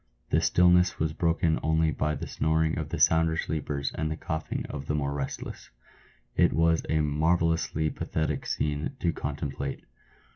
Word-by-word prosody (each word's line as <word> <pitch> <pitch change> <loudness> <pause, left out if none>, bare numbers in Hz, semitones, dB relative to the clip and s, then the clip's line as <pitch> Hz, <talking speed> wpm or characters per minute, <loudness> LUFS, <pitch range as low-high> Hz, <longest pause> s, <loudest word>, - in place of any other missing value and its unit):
The - - +3
stillness 90 +1 +4
was 80 -1 -1
broken 80 -1 +1
only 80 0 +2
by 75 0 -1
the - - -5
snoring 80 0 +1
of 75 -2 -4
the - - -3
sounder 80 0 +4
sleepers 75 -3 -2
and 80 0 -2
the 80 - -3
coughing 80 -3 -3
of 70 0 -6
the 75 - 0
more 70 -1 -1
restless. 70 -2 -5 0.7
It - - +4
was 80 0 +3
a 80 0 +2
marvellously 80 +1 +1
pathetic 80 -1 -2
scene 75 - -2
to 85 -6 +1
contemplate. 70 -1 -4
80 Hz, 155 wpm, -28 LUFS, 75-80 Hz, 0.7 s, stillness